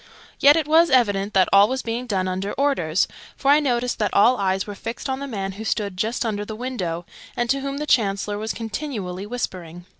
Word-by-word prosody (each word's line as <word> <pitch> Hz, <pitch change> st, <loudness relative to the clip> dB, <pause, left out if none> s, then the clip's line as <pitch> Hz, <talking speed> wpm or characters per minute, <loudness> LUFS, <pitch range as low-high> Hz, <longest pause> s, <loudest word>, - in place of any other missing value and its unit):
Yet 290 Hz, +1 st, +7 dB
it 320 Hz, -3 st, 0 dB
was 330 Hz, +2 st, +5 dB
evident 205 Hz, -6 st, +2 dB
that 190 Hz, -1 st, +5 dB
all 200 Hz, +1 st, +7 dB
was 260 Hz, +2 st, -3 dB
being 235 Hz, +2 st, -3 dB
done 190 Hz, -4 st, 0 dB
under 190 Hz, +2 st, -3 dB
orders, 225 Hz, -, +1 dB, 0.3 s
for 275 Hz, -, +2 dB
I 295 Hz, -, +6 dB
noticed 250 Hz, -4 st, -1 dB
that 210 Hz, -, 0 dB
all 235 Hz, +5 st, +5 dB
eyes 190 Hz, 0 st, 0 dB
were 205 Hz, -, -6 dB
fixed 230 Hz, +3 st, -6 dB
on 265 Hz, 0 st, -2 dB
the 280 Hz, -, -5 dB
man 195 Hz, -6 st, -4 dB
who 205 Hz, +3 st, -8 dB
stood 205 Hz, -3 st, -2 dB
just 225 Hz, +6 st, -1 dB
under 205 Hz, -2 st, -2 dB
the 215 Hz, +1 st, -7 dB
window, 190 Hz, -9 st, -4 dB, 0.3 s
and 240 Hz, -, 0 dB
to 275 Hz, -, +1 dB
whom 275 Hz, 0 st, -4 dB
the 300 Hz, -, -3 dB
Chancellor 205 Hz, -5 st, +1 dB
was 220 Hz, +1 st, -3 dB
continually 210 Hz, -5 st, -5 dB
whispering. 175 Hz, -7 st, -5 dB
220 Hz, 215 wpm, -22 LUFS, 195-260 Hz, 0.3 s, Yet